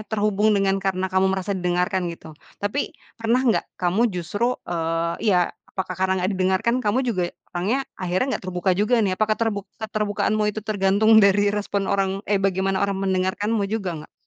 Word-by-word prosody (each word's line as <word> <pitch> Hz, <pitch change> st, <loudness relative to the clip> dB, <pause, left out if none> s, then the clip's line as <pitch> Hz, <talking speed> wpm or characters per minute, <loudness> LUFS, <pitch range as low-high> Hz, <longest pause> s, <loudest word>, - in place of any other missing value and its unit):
terhubung 210 Hz, -1 st, +2 dB
dengan 195 Hz, 0 st, +1 dB
karena 190 Hz, -1 st, -1 dB
kamu 190 Hz, 0 st, +3 dB
merasa 190 Hz, +1 st, -1 dB
didengarkan, 180 Hz, 0 st, 0 dB
gitu. 165 Hz, -1 st, -9 dB, 0.2 s
Tapi 205 Hz, +8 st, -3 dB, 0.2 s
pernah 235 Hz, +3 st, +2 dB
nggak 235 Hz, -4 st, 0 dB
kamu 190 Hz, +7 st, +2 dB
justru, 205 Hz, +6 st, -1 dB
eee, 165 Hz, 0 st, -1 dB
iya, 180 Hz, -3 st, +3 dB, 0.2 s
apakah 185 Hz, -1 st, -2 dB
karena 190 Hz, 0 st, 0 dB
nggak 185 Hz, -, +1 dB
didengarkan, 190 Hz, +5 st, +1 dB
kamu 250 Hz, +3 st, +1 dB
juga 185 Hz, -8 st, 0 dB, 0.2 s
orangnya 215 Hz, +10 st, 0 dB, 0.2 s
akhirnya 185 Hz, +4 st, 0 dB
nggak -, -, -3 dB
terbuka 180 Hz, +1 st, +1 dB
juga, 210 Hz, +4 st, +2 dB
nih. 190 Hz, -, +1 dB
Apakah 215 Hz, +2 st, +1 dB
terbu 225 Hz, -3 st, -1 dB, 0.2 s
keterbukaanmu 215 Hz, -1 st, -1 dB
itu 210 Hz, 0 st, -4 dB
tergantung 210 Hz, +1 st, +4 dB
dari 205 Hz, +1 st, +4 dB
respon 205 Hz, -1 st, -1 dB
orang 195 Hz, 0 st, -1 dB
eh, 200 Hz, -1 st, +1 dB
bagaimana 195 Hz, 0 st, 0 dB
orang 200 Hz, -1 st, 0 dB
mendengarkanmu 195 Hz, +3 st, 0 dB
juga 205 Hz, -4 st, -2 dB
nggak? 150 Hz, -, -14 dB
195 Hz, 170 wpm, -23 LUFS, 185-215 Hz, 0.2 s, tergantung